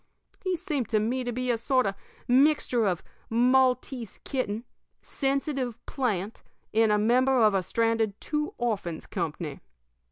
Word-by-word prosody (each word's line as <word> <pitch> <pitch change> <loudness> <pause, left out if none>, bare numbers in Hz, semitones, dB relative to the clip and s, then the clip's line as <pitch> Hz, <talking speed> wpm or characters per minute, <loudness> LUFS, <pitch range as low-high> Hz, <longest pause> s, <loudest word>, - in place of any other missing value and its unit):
He 370 -1 0
seemed 310 - -3
to 215 - +2
me 245 +4 -1
to 245 - -2
be 250 +1 -1
a 230 - 0
sort 255 +1 +2
of 195 - 0 0.3
a - - -2
mixture 255 -4 +4
of 180 -3 -1 0.3
Maltese 250 -1 +2
kitten, 235 -5 -2 0.4
sensitive 270 -4 -1
plant, 220 -6 -2 0.3
and 220 0 +4
a 210 - +4
member 255 +5 +3
of 215 -1 +5
a 195 - +2
stranded 225 0 0
'Two 300 -1 -2
Orphans' 200 -9 -2
company. 155 -2 -4
240 Hz, 150 wpm, -27 LUFS, 215-265 Hz, 0.4 s, of